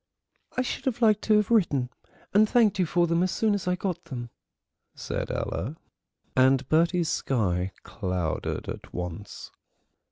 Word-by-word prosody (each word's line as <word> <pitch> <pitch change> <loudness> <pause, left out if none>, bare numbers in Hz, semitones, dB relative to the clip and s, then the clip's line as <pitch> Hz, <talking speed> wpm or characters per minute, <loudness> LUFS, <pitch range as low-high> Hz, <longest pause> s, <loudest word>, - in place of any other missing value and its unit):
"I 255 - +2
should 250 - -4
have 245 -2 -1
liked 215 -2 +5
to 215 - +4
have 210 +2 +1
written 145 - +2 0.4
and 210 +2 +5
thanked 215 -5 +3
you 180 - +2
for 175 +2 +2
them 170 0 +1
as 185 - +2
soon 215 +3 +1
as 200 -3 -2
I 180 - +2
got 180 -2 -3
them," 120 -6 -6 0.6
said - - -4
Ella, 130 +10 -3 0.6
and 130 0 +4
Bertie's 170 +1 +3
sky 95 -7 0
clouded 90 -6 -3
at - - -7
once. 90 +3 -6
170 Hz, 155 wpm, -27 LUFS, -, 0.6 s, liked